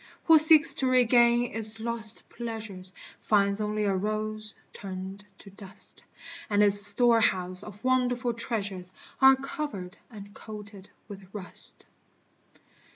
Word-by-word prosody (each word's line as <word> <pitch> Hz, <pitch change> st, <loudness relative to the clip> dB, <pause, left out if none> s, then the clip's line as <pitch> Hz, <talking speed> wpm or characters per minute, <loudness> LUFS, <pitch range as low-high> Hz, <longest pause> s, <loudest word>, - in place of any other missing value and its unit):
Who 325 Hz, -1 st, +7 dB
seeks 315 Hz, 0 st, +5 dB
to 265 Hz, -, +1 dB
regain 240 Hz, -1 st, +4 dB
its 220 Hz, 0 st, 0 dB
lost 225 Hz, -1 st, -3 dB
pleasures, 220 Hz, -6 st, -7 dB, 0.3 s
Finds 200 Hz, -1 st, +1 dB
only 210 Hz, 0 st, -2 dB
a 200 Hz, -2 st, +1 dB
rose 215 Hz, +2 st, -3 dB, 0.2 s
turned 190 Hz, +1 st, -8 dB
to 195 Hz, -, -14 dB
dust; 195 Hz, 0 st, -12 dB, 0.5 s
And 205 Hz, 0 st, +3 dB
its 205 Hz, 0 st, +4 dB
storehouse 205 Hz, -5 st, +2 dB
of 210 Hz, +1 st, -12 dB
wonderful 250 Hz, -1 st, +1 dB
treasures 205 Hz, -6 st, -5 dB, 0.3 s
Are 265 Hz, 0 st, +8 dB
covered 270 Hz, -, -6 dB
and 205 Hz, -3 st, -12 dB
coated 205 Hz, -3 st, -11 dB, 0.2 s
with 195 Hz, -3 st, -11 dB
rust. 190 Hz, -3 st, -11 dB
215 Hz, 120 wpm, -27 LUFS, 200-240 Hz, 0.5 s, Are